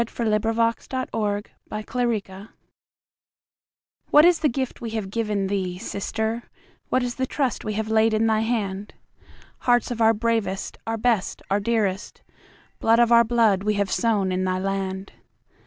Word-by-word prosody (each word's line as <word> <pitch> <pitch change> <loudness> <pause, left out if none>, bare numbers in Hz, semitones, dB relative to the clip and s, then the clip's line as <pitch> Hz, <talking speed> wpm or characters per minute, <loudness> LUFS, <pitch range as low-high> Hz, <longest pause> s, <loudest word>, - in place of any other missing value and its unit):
Frederick 215 -3 0
George 230 +1 +1
Scott 260 -1 -4
To 205 -2 -1 0.6
France 200 -3 -4 1.6
WHAT 300 +2 +7
is 350 -1 +5
the 300 - +2
gift 260 +1 -3
we 235 - -4
have 215 -3 -4
given 210 -3 -1
thee, 190 -2 -2
Sister? 220 +3 -3 0.4
What 255 - +2
is 245 -1 -2
the 260 +1 -2
trust 265 -3 -1
we 215 - -3
have 220 +1 -2
laid 220 0 +3
in 220 +1 +2
thy 220 -1 +2
hand? 210 -3 -2 0.6
Hearts 245 -1 +2
of 230 -1 -3
our 225 0 +5
bravest, 215 -4 -1
our 225 0 -1
best, 225 -3 0
and - - -28
our 200 - +3
dearest, 205 -3 -1 0.6
Blood 225 +1 +4
of 240 0 +4
our 235 0 +7
blood 225 -4 +3
we 210 +1 0
have 200 -1 0
sown 210 -5 +1
in 185 0 0
thy 185 0 0
land. 195 0 -3
220 Hz, 165 wpm, -24 LUFS, 200-230 Hz, 1.6 s, WHAT